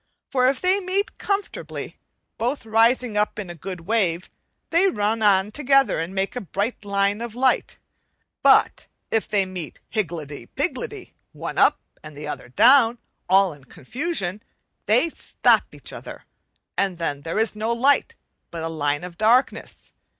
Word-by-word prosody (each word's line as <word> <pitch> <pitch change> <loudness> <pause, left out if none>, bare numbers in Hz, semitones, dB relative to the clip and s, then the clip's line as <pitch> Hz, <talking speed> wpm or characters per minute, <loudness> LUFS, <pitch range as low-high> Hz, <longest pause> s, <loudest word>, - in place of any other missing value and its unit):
Fir 255 -1 +3
if 265 - -1
they 370 +2 +2
meet 390 +1 -2
comfortably, 400 0 -4 0.4
both 245 +2 -2
rising 225 +1 +2
up 210 0 0
in 195 -5 -5
a - - -7
good 180 +1 -7
wave, 185 -3 0 0.4
they 345 +4 +4
run 220 - 0
on 200 -1 +3
together 275 - +3
and 170 +4 -4
make 195 +4 -1
a 250 - -3
bright 205 +5 -3
line 200 +1 0
of 235 -1 -6
light; 260 +1 +1 0.6
but - - +4 0.2
if 225 - +1
they 200 -2 +1
meet 180 -5 -7
higgledy 155 - -4
piggledy, - - -4 0.2
one - - -5
up - - +5 0.2
and 150 -1 -11
the 150 0 -7
other 125 - -6
down, 245 - +5 0.3
all 190 -2 +4
in 145 -2 -17
confusion, 210 - -4 0.5
they 240 +10 +4
stop 330 - +2
each - - -9
other, - - -9 0.5
and 190 -3 0
then 145 -4 -2
there 165 +5 -4
is 220 0 +1
no 220 +2 -1
light 265 +5 +2 0.3
but 165 -1 -6
a 165 - -2
line 145 -1 -1
of 175 -1 -9
darkness. 235 +5 +1
210 Hz, 155 wpm, -23 LUFS, 175-245 Hz, 0.6 s, up